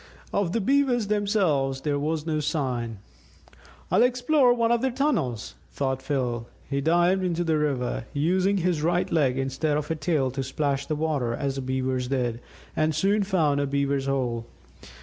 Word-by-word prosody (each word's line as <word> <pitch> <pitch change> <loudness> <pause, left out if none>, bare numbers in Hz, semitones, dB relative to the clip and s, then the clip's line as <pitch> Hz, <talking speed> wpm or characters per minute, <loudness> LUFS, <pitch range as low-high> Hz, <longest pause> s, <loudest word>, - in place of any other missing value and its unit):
Of 200 -4 +1
the 230 - 0
Beavers 250 -3 +2
themselves 185 -11 +1
there 145 0 0
was 155 +1 -2
no 155 -2 0
sign. 125 - -2 0.9
"I'll - - +4
explore 250 +2 +4
one 235 -1 +2
of 235 -1 +2
their 265 - +1
tunnels," 240 - -1 0.2
thought 130 -1 -2
Phil. 125 -4 -2 0.2
He 140 0 -1
dived 175 +5 +3
into 175 -1 0
the 160 -2 +1
river, 130 -6 -1
using 185 +7 +1
his 175 -4 0
right 175 +3 +1
leg 140 -6 +2
instead 135 +3 0
of 150 +1 -3
a - - +1
tail 155 -5 0
to 135 +2 -3
splash 140 +1 -1
the 155 - -1
water 145 -6 -1
as 140 +1 -2
the - - -2
Beavers 130 -1 -1
did, 125 -3 -1 0.3
and 155 0 +1
soon 200 +5 +2
found 165 -8 +1
a 140 - 0
Beaver's 140 -1 0
hole. 120 -4 -1
150 Hz, 170 wpm, -26 LUFS, 135-185 Hz, 0.9 s, I'll